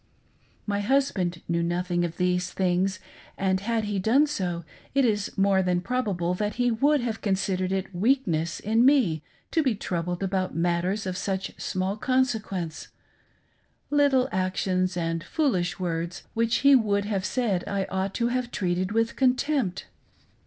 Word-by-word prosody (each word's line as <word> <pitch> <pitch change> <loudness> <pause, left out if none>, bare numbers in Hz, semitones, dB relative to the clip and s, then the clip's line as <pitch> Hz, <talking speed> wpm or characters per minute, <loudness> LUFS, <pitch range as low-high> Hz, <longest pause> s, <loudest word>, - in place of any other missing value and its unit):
My 205 -1 -1
husband 205 -8 0
knew 170 0 0
nothing, 175 +1 0
of 170 -1 -3
these 180 0 +1
things, 185 0 0 0.4
and, 190 -1 +1
had 225 +2 -1
he 205 -1 -2
done 240 +10 +4
so, 180 - -3 0.3
ij 275 - +4
is 210 -4 0
more 195 -1 +3
t*han 180 -1 +1
probable 185 -5 -1
that 210 +3 -2
he 245 0 +2
would 285 +5 +3
have 230 -2 -3
considered 190 -2 0
it 190 0 -2
weakness 175 - +1
in 225 +3 +2
me 250 - +4 0.3
to 325 - +3
be 260 -7 +1
troubled 175 -1 -3
about 185 -3 -1
matters 175 +4 0
of 185 -1 -3
such 190 0 -3
small 185 +2 -2
consequence 220 -10 -1 0.5
— - - -41 0.3
little 280 -3 +4
actions 185 0 0
and 165 -1 -1
foolish 190 - 0
words 170 -1 -3
which 230 0 +1
he 280 0 +8
would 205 -4 +2
have 200 -3 -1
said 205 -5 0
I 195 -1 -1
ought 190 +1 -2
to 235 0 +1
have 250 0 -1
treated 185 -1 -1
with 225 0 +1
contempt. 255 -6 +1
195 Hz, 155 wpm, -26 LUFS, 180-235 Hz, 0.5 s, he